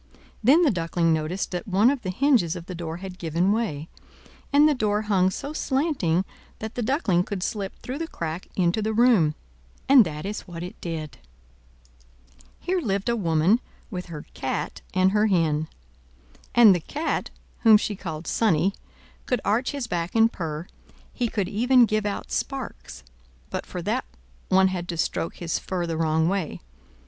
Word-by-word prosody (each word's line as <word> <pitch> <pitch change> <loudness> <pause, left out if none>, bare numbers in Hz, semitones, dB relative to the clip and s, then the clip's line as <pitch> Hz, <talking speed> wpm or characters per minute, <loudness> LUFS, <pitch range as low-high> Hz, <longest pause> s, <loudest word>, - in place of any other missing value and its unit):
Then 290 +10 +6
the 300 - +4
Duckling 165 -2 +1
noticed 160 +5 -2
that 180 +2 -4
one 205 +6 +4
of 280 -3 -3
the 190 - -4
hinges 225 - +2
of 170 -2 -7
the 185 - -7
door 165 -1 -5
had 185 0 -8
given 170 +4 +1
way, 200 -9 -1 0.6
and 290 +1 +6
the 305 - +4
door 210 -4 0
hung 190 -3 +3
so 280 +9 -5
slanting 265 - 0 0.3
that 220 0 -6
the 245 - -3
Duckling 215 - +1
could 185 -1 -4
slip 200 -2 -3
through 260 +4 -6
the 330 - -3
crack 165 - -5
into 180 +3 +1
the 220 +1 -1
room; 215 -10 +4 0.5
and 270 -3 +8
that 155 -2 -6
is 205 +1 -5
what 170 -1 -7
it 180 - -7
did. 155 -6 -5 1.4
Here 365 +1 -1
lived 200 -5 -1
a 235 - +2
woman, 175 +2 +3 0.3
with 180 -3 -5
her 155 -3 -8
Cat - - -3
and 185 +1 +3
her 210 +1 +3
Hen. 160 -5 +1 0.9
And 230 -4 +8
the 175 - 0
Cat, 300 - -3 0.3
whom 220 -2 +7
she 210 0 -3
called 165 -4 -6
Sonnie, 195 -3 +2 0.5
could 250 - +1
arch 225 +6 +1
his 280 -3 -3
back 175 -3 -3
and 225 +1 +4
purr, 160 -2 -4 0.5
he 245 - 0
could 205 -4 -1
even 245 +5 +4
give 215 -1 0
out 200 - -4
sparks; 150 - -4 0.5
but - - -4
for - - -5
that - - -1 0.4
one 190 0 +5
had 180 -2 -4
to 170 - -3
stroke 165 - -1
his 170 -2 -2
fur 180 -2 -3
the 165 -1 -3
wrong 160 0 +1
way. 190 -4 -2
190 Hz, 175 wpm, -25 LUFS, 170-230 Hz, 1.4 s, and